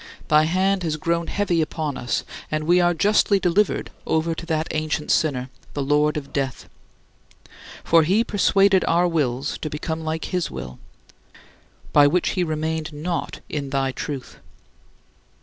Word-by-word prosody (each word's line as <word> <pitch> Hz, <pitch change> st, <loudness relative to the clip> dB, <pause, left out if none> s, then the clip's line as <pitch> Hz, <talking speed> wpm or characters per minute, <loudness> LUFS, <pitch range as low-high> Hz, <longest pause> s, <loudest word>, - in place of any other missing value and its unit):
Thy 155 Hz, 0 st, +5 dB
hand 185 Hz, +3 st, +1 dB
has 160 Hz, -3 st, -1 dB
grown 170 Hz, +1 st, -1 dB
heavy 180 Hz, -5 st, 0 dB
upon 155 Hz, -2 st, -2 dB
us, 120 Hz, -, -2 dB, 0.3 s
and 155 Hz, 0 st, -1 dB
we 175 Hz, +3 st, +4 dB
are 175 Hz, 0 st, +4 dB
justly 200 Hz, +2 st, +3 dB
delivered 185 Hz, +3 st, +1 dB, 0.2 s
over 160 Hz, +1 st, +1 dB
to 165 Hz, +1 st, -8 dB
that 160 Hz, -1 st, 0 dB
ancient 155 Hz, -1 st, -2 dB
sinner, 130 Hz, -6 st, +1 dB, 0.2 s
the 145 Hz, -, -1 dB
lord 150 Hz, +2 st, +2 dB
of 140 Hz, -2 st, -7 dB
death. 135 Hz, -3 st, -3 dB, 1.2 s
For 165 Hz, 0 st, +5 dB
he 190 Hz, +8 st, +3 dB
persuaded 195 Hz, -3 st, +3 dB
our 175 Hz, +2 st, +3 dB
wills 140 Hz, -5 st, -1 dB
to 155 Hz, -, -4 dB
become 160 Hz, +2 st, -4 dB
like 160 Hz, 0 st, -3 dB
his 180 Hz, -2 st, -2 dB
will, 65 Hz, 0 st, -8 dB, 1.1 s
by 145 Hz, -1 st, +7 dB
which 175 Hz, +4 st, +1 dB
he 185 Hz, -, 0 dB
remained 160 Hz, 0 st, -2 dB
not 165 Hz, +3 st, -4 dB
in 140 Hz, -2 st, -4 dB
thy 135 Hz, -1 st, 0 dB
truth. 135 Hz, 0 st, -6 dB
160 Hz, 150 wpm, -23 LUFS, 150-175 Hz, 1.2 s, by